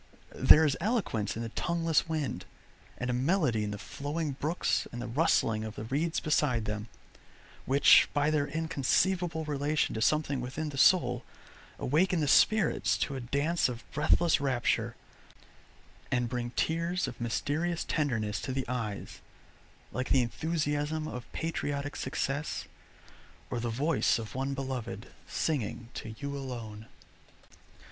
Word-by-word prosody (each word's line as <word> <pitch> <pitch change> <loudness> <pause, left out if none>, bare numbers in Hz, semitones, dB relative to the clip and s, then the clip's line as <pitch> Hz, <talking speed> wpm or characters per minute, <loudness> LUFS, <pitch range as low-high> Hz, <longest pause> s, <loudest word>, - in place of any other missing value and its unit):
There 160 +1 +7
is 140 -3 +2
eloquence 175 - -1
in 115 - -3
the 115 - -4
tongueless 165 +4 0
wind, 155 -4 -2 0.5
and 125 +1 -2
a - - -1
melody 130 - +1
in 105 - -2
the 105 - -4
flowing 145 +7 -4
brooks 150 +6 -1
and 120 - -6
the 120 - -4
rustling 115 -4 +2
of 110 0 -6
the - - -5
reeds 150 +8 -1
beside 135 -7 +1
them, 105 +1 -4 0.8
which 140 +2 +6
by 145 +1 +2
their 145 -2 +1
inconceivable 160 +2 0
relation 150 +1 0
to 110 - -3
something 145 0 +1
within 140 +5 -4
the 140 - -7
soul, 125 -4 +4 0.5
awaken 170 +6 +2
the 150 - +1
spirits 215 +9 +4
to 140 - -2
a - - -3
dance 140 +6 +1
of 120 -1 -6
breathless 155 +2 +3
rapture, 130 -4 0 1.2
and 125 -1 +1
bring 120 -1 -2
tears 170 +3 0
of 120 - -8
mysterious 155 +8 -1
tenderness 110 - -1
to 130 - -4
the 130 0 -2
eyes, 115 -5 -4 0.7
like 125 +1 -3
the 130 -2 +4
enthusiasm 155 +3 -1
of 125 -4 -7
patriotic 145 -3 -3
success, 140 +3 -2 0.9
or 120 - -1
the 120 0 -2
voice 140 +7 +2
of 110 -2 -6
one 135 +1 -2
beloved 125 -4 -5 0.2
singing 120 -6 -2
to 110 -1 -7
you 140 +4 -4
alone. 115 -6 -6
140 Hz, 140 wpm, -30 LUFS, 120-155 Hz, 1.2 s, There